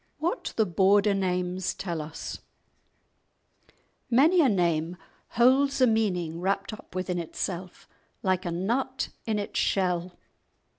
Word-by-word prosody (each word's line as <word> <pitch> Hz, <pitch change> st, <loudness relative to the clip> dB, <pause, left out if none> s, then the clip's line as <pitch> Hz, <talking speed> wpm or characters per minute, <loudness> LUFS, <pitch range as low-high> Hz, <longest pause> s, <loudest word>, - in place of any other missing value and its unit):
—WHAT 345 Hz, +10 st, -2 dB
THE 220 Hz, -, +3 dB
BORDER 200 Hz, +3 st, +3 dB
NAMES 180 Hz, -1 st, -1 dB
TELL 170 Hz, -4 st, -3 dB
US 150 Hz, +1 st, -7 dB, 1.7 s
Many 305 Hz, +9 st, +5 dB
a 275 Hz, -, +4 dB
name 170 Hz, -3 st, 0 dB, 0.4 s
holds 270 Hz, +3 st, +4 dB
a 255 Hz, -, +6 dB
meaning 180 Hz, -8 st, 0 dB
wrapt 195 Hz, +3 st, -1 dB
up 215 Hz, -, -12 dB
within 185 Hz, -1 st, -2 dB
itself 180 Hz, +2 st, -5 dB, 0.4 s
like 185 Hz, -1 st, +1 dB
a 175 Hz, -, -3 dB
nut 235 Hz, +10 st, -1 dB, 0.2 s
in 220 Hz, -1 st, 0 dB
its 205 Hz, -, -3 dB
shell. 180 Hz, -2 st, 0 dB
190 Hz, 120 wpm, -27 LUFS, 180-225 Hz, 1.7 s, a